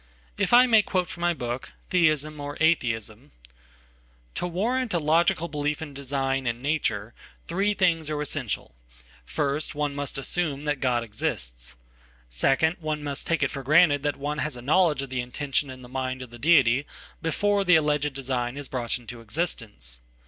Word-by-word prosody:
if - - +1
I 245 +1 +8
may 225 -3 +6
quote 185 -3 -1
from 170 - -8
mybook, 130 -8 -2 0.2
Theism, 155 -4 +2
or 145 0 -5
Atheism: 115 - 0 0.5
— - - -33
"To 180 - -2
warrant 225 +5 0
a - - +3
logical 165 +2 +2
belief 150 -1 -2
in 155 -3 -7
design, 135 -1 -1
in 120 0 -1
nature, 120 -6 -1 0.3
three 200 +4 0
things 165 -6 +2
are 150 -1 -2
essential. 145 -6 -3 0.5
First, 140 - -1
one 145 -1 -1
must 140 -1 -4
assume 145 0 -1
that 150 -2 -1
God 125 -3 +1
exists. - - -3 0.6
Second, 150 - +2
one 155 -2 -3
must 145 -1 -3
take 165 -3 +1
it 140 - +1
for 135 - -5
granted 145 +1 +5
that 145 0 -1
one 145 +2 -3
has 150 -3 -2
a - - -8
knowledge 150 -1 +3
of 135 - -8
the 125 -1 -1
intention 135 +3 -2
in 130 -1 -9
the - - -10
mind 130 0 -3
of 125 - -12
the 120 - -11
deity 135 -3 +4 0.3
before 200 +5 +1
the 180 -2 +6
alleged 150 -2 +2
design 130 -1 -2
is 145 -2 -6
brought 120 -3 -2
into 120 -1 -10
existence. 105 - -3
145 Hz, 175 wpm, -26 LUFS, 125-160 Hz, 0.6 s, I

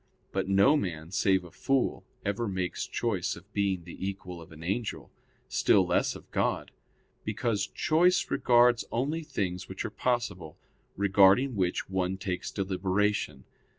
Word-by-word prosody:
But 95 -1 -1
no 100 +10 +5
man, 85 - -3
save 95 -1 +2
a 85 - -12
fool, 135 - 0 0.2
ever 100 +4 -1
makes 95 -2 -2
choice 100 -7 -1
of 95 +4 -15
being 100 -3 0
the 85 - -10
equal 95 -3 -5
of 80 - -13
an 80 +1 -11
angel, 105 +6 -3 0.4
still - - +3
less - - +1
of - - -13
God; - - 0 0.5
because 110 -2 -1
choice 175 +3 +2
regards 120 -1 +4
only 145 +7 -1
things 95 - -3
which - - -5
are - - -4
possible, 105 -11 -2 0.4
regarding 100 +6 +5
which 90 -3 0
one 95 0 -1
takes 95 -1 -3
deliberation. 95 -6 -1
100 Hz, 145 wpm, -29 LUFS, 90-120 Hz, 0.5 s, no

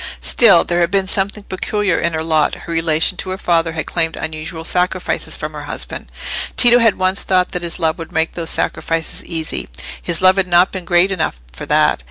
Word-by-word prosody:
Still, 200 -8 +5
there 175 0 -1
had 170 -1 +2
been 195 0 +1
something 200 +2 -1
peculiar 200 0 -1
in 170 - -1
her 160 0 -2
lot: 155 -2 +1
her 170 - -5
relation 165 +2 +2
to 185 - -3
her 185 - -3
father 165 -3 0
had 160 -2 -3
claimed 165 -2 -1
unusual 160 +1 -6
sacrifices 180 +1 -1
from - - -6
her - - -7
husband. - - -6 0.5
Tito 245 0 +7
had 225 -3 +3
once 185 +1 +1
thought 185 -1 +1
that 180 - -3
his 170 -1 -3
love 165 0 -1
would 165 - -8
make 160 +1 0
those 165 -2 -3
sacrifices 165 -1 -2
easy; 160 -2 -3 0.3
his 170 -2 0
love 185 +1 +5
had 190 -1 +1
not 175 +1 +4
been 185 -2 -5
great 175 +3 +3
enough 160 - -2
for 60 - -8
that. - - +3
175 Hz, 210 wpm, -17 LUFS, 165-190 Hz, 0.5 s, Tito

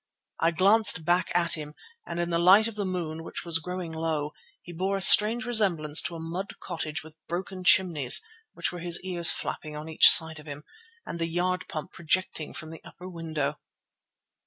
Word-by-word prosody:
I 165 - +2
glanced 190 0 +2
back 175 +1 0
at 175 -1 +5
him, 150 -1 -5 0.3
and 170 - -6
in 175 0 -3
the 170 - 0
light 190 +6 +5
of 230 - -7
the 205 -1 -5
moon, 165 -3 -5
which - - -8
was 165 -1 0
growing 180 0 -7
low, 160 -2 -4 0.3
he 175 - -12
bore 190 +4 -3
a - - -5
strange 220 +6 +6
resemblance 180 -11 +2
to 170 - -5
a - - -8
mud 170 +5 -7
cottage 160 -4 -6
with 160 0 -16
broken 185 +2 -6
chimneys 165 -9 +4 0.3
(which - - -3
were 175 - -9
his 175 0 -1
ears 175 -3 +2
flapping 155 -1 -4
on 150 +1 -9
each 160 - +6
side 160 -1 +7
of 150 - -16
him), 145 0 -9 0.4
and 170 - -8
the 165 - -2
yard 180 +2 -3
pump 155 +3 -8
projecting 170 -2 -3
from 155 -1 -10
the 165 - -12
upper 180 - -13
window. 160 -5 -5
170 Hz, 195 wpm, -25 LUFS, 160-185 Hz, 0.4 s, side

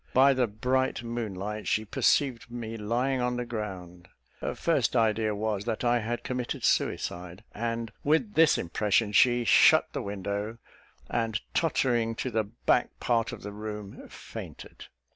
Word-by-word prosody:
By 135 +2 +6
the 130 -2 +1
bright 125 +4 0
moon 115 -4 -4
light, 105 +3 -5
she 110 - +1
perceived 125 +2 +1
me 115 -2 -6
lying 120 +5 0
on 125 0 0
the 125 - -2
ground. 95 -6 -6 0.3
Her - - -3
first - - +1
idea 110 -1 +2
was, 105 -1 -2
that 115 0 -2
I 120 0 +3
had 120 +1 -3
committed 125 -1 -3
suicide; 90 +3 -1
and, 115 0 -3
with 160 +9 +2
this 165 -4 +5
impression, 105 +4 +1
she 120 +3 +4
shut - - +5
the - - -2
window, 100 +2 -4 0.5
and 115 -2 -1
tottering 120 -8 +1
to 130 - -3
the 110 -1 0
back 120 +3 0
part 115 -2 +1
of - - -9
the 105 - -6
room, 105 -1 -7
fainted. - - -10
115 Hz, 155 wpm, -28 LUFS, 105-120 Hz, 0.5 s, By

